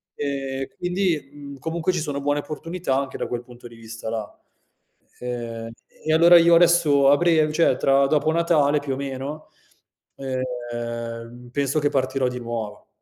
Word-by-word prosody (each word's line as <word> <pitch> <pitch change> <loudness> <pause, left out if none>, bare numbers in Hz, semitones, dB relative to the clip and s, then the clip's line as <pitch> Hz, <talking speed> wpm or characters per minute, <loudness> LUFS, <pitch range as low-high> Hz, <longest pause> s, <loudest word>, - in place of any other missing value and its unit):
Ehm, 135 -2 -3
quindi, 175 -5 -1
mhmm, 140 -1 -10
comunque 165 +5 -1
ci 175 - -1
sono 145 -3 -3
buone 145 +1 0
opportunità 155 0 -3
anche 135 -1 -3
da - - -3
quel 120 -1 -3
punto 120 -1 -13
di 115 - -14
vista 115 0 -8
là. 110 -2 -5 0.8
Ehm, 115 -2 -5 0.2
e 155 - -3
allora 170 +2 +8
io 170 0 +6
adesso 165 -5 +5
a 145 - +6
brev 160 -2 +3
cioè 155 -5 +3
tra 135 +1 +3
dopo 155 +2 +2
Natale 160 -3 +3
più 145 -2 -3
o - - -4
meno, 140 +2 -6 0.7
ehm, 120 -2 -5
penso 140 +2 0
che 145 -1 +1
partirò 130 -1 0
di 125 - -6
nuovo. 115 -3 -6
140 Hz, 160 wpm, -23 LUFS, 125-155 Hz, 0.8 s, allora